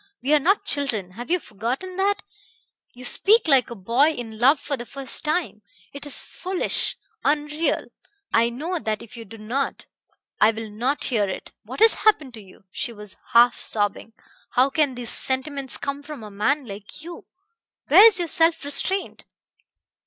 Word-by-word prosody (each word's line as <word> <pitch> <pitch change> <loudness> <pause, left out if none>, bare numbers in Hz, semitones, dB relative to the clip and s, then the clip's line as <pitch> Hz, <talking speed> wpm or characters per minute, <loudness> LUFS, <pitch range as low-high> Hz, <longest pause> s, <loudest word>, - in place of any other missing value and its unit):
We 280 +4 +2
are 300 - +6
not 385 +8 +1
children 230 -10 0
have 240 +8 -9
you 360 - +3
forgotten 255 - -5
that? 405 +1 0 0.7
You 250 +1 -9
speak 425 - +4
like 270 -4 +4
a 235 - -7
boy 235 +9 +2
in 230 -7 -6
love 270 +5 +5
for 290 - -2
the 240 - -7
first 275 -1 -3
time. 305 -8 -2 0.3
It 285 +1 -5
is 290 - +3
foolish, 370 -1 -2 0.3
unreal 300 +2 0 0.5
I 230 +1 +4
know 320 +9 -4
that 215 -6 -3
if 230 +1 -13
you 230 -1 -9
do 225 +3 -12
not. 240 +6 -3 0.5
I 215 - +6
will 225 -1 -5
not 250 +7 -1
hear 210 -6 0
it. - - -7
What - - -8
has 450 0 +7
happened 310 - +2
to 220 - -10
you?" 195 0 -18
She 235 - -3
was 210 -3 -10 0.2
half 240 +1 +5
sobbing. 205 +1 -1 0.4
"How 260 +2 +3
can 290 -3 +1
these 240 -2 -2
sentimentalities 265 0 -1
come 280 0 -4
from 285 -5 -9
a 210 - -9
man 265 +8 0
like 205 +6 -9
you? 340 +1 -10 0.6
Where 435 - +9
is 430 -5 +3
your 350 -2 0
self 325 -1 +3
restraint?" 375 +7 0
270 Hz, 175 wpm, -23 LUFS, 225-310 Hz, 0.7 s, Where